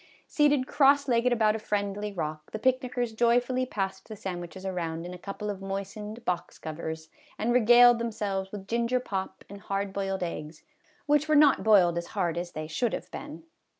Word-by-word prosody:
Seated 290 -3 +2
cross 280 +1 +4
legged 245 0 +2
about 220 -3 +3
a - - -3
friendly 205 0 -2
rock, 155 -4 -5
the - - -5
picnickers 250 0 0
joyfully 245 +3 +2
passed 190 -3 -4
the 215 - -6
sandwiches 185 -1 -6
around 170 -3 -3
in 180 - -6
a - - -7
couple 205 +2 -5
of 195 -1 -8
moistened 200 +3 -6
box 180 -1 -2
covers, 160 0 -6 0.3
and 235 +3 0
regaled 240 0 +7
them 235 0 -2
selves 195 -2 -3
with 195 -2 -8
ginger 235 +3 +1
pop 195 -6 -5
and 200 0 -11
hard 195 0 -3
boiled 195 -1 -2
eggs, 155 -2 -6 0.4
which 295 +1 +2
were 305 - +4
not 295 -1 +6
boiled 180 -6 +5
as 170 - -7
hard 175 -4 +1
as 175 0 -4
they 155 0 -4
should 215 +9 -1
have - - -5
been. 295 +2 -8
205 Hz, 185 wpm, -28 LUFS, 185-240 Hz, 0.4 s, regaled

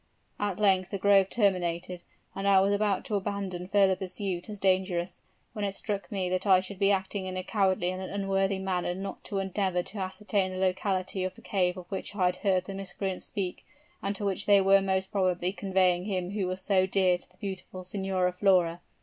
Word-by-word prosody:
"At 205 -3 -1
length 190 -3 +3
the 200 - -3
grove 195 0 +4
terminated, 180 -4 0 0.3
and 195 - -3
I 195 -1 +6
was 195 +1 +3
about 205 -1 +1
to - - -5
abandon 195 -3 -2
further 195 -1 +4
pursuit 185 0 -4
as 210 -1 -7
dangerous, 185 -2 +1 0.3
when 210 -3 -4
it 200 -1 -1
struck 200 -1 -4
me 190 -3 -1
that 185 +2 -1
I 190 -2 +7
should 190 +1 -7
be 200 -1 +4
acting 190 0 0
in 185 0 -4
a 185 - -2
cowardly 190 -3 +1
and 185 0 -5
unworthy 195 0 0
manner 185 -2 -1
not 195 +1 -6
to 200 - -3
endeavor 190 -2 0
to 205 - -8
ascertain 190 +1 -1
the - - -5
locality 185 0 0
of 185 - -3
the - - -16
cave 180 -2 0
of 180 - -8
which 195 +1 -4
I 185 -3 +2
had 180 0 +1
heard 190 -3 +1
the 195 - -6
miscreants 195 0 -4
speak, 190 -4 -4 0.4
and 200 +1 -2
to 205 - -3
which 200 0 -1
they 200 -1 +7
were 195 0 +5
most 190 0 -1
probably 185 -2 +1
conveying 185 -2 +2
him 185 -3 -2
who 200 -2 -1
was 185 +1 -3
so 190 -1 +2
dear 185 -2 +3
to - - -14
the 180 - -25
beautiful 190 -1 -6
Signora 185 -1 -1
Flora. 180 -3 +3
190 Hz, 210 wpm, -29 LUFS, 185-200 Hz, 0.4 s, I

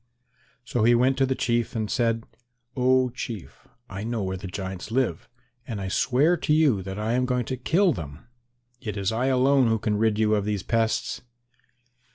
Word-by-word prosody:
So 120 -2 -1
he 120 +1 +5
went 130 +3 +3
to 135 - +3
the 130 - 0
Chief 120 -2 -1
and 110 -1 -1
said, 115 0 0 0.5
"Oh, 130 0 +3
Chief, 115 -6 -8 0.2
I 95 +1 -6
know 115 -2 -2
where 95 0 -2
the 95 +1 -7
giants 95 0 -6
live 115 -8 -1 0.4
and 110 -4 -4
I 95 -1 -4
swear 135 - +3
to 150 - -2
you 150 -10 +4
that 95 +1 -6
I 110 +2 -1
am 125 +1 +1
going 125 -2 0
to 130 - -3
kill 170 +8 +2
them. 75 - -8 0.6
It 105 -2 -5
is 100 0 0
I 120 +4 0
alone 135 0 +4
who 115 0 +2
can 105 -1 -1
rid 110 -1 +2
you 110 0 +2
of 105 -2 +1
these 105 -2 -2
pests." 115 +1 0
115 Hz, 195 wpm, -25 LUFS, 105-130 Hz, 0.6 s, he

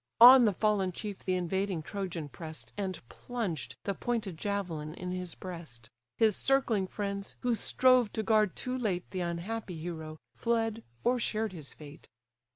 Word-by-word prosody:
On 250 +1 +11
the 210 - +3
fallen 205 -3 +2
chief 205 +2 -6
the 185 - +1
invading 185 -1 -1
Trojan 180 -4 -4
press'd, 160 +2 -9
And 190 -3 -3
plunged 210 - -4
the 200 - -1
pointed 220 -4 -2
javelin 170 -5 -3
in 180 0 -5
his 180 -2 -4
breast. 155 -11 -8 0.3
His 220 -3 +4
circling 235 -8 +2
friends, 200 0 -4
who 245 -1 +2
strove 255 0 +4
to 220 - -1
guard 215 -3 +3
too 255 0 -3
late 200 -8 -1
The 185 - -3
unhappy 175 +2 -3
hero, 160 -1 -6 0.2
fled, 225 -1 0 0.2
or 245 +1 +3
shared 220 -2 -1
his 155 -6 -8
fate. 150 -1 -12
195 Hz, 160 wpm, -31 LUFS, 170-225 Hz, 0.3 s, On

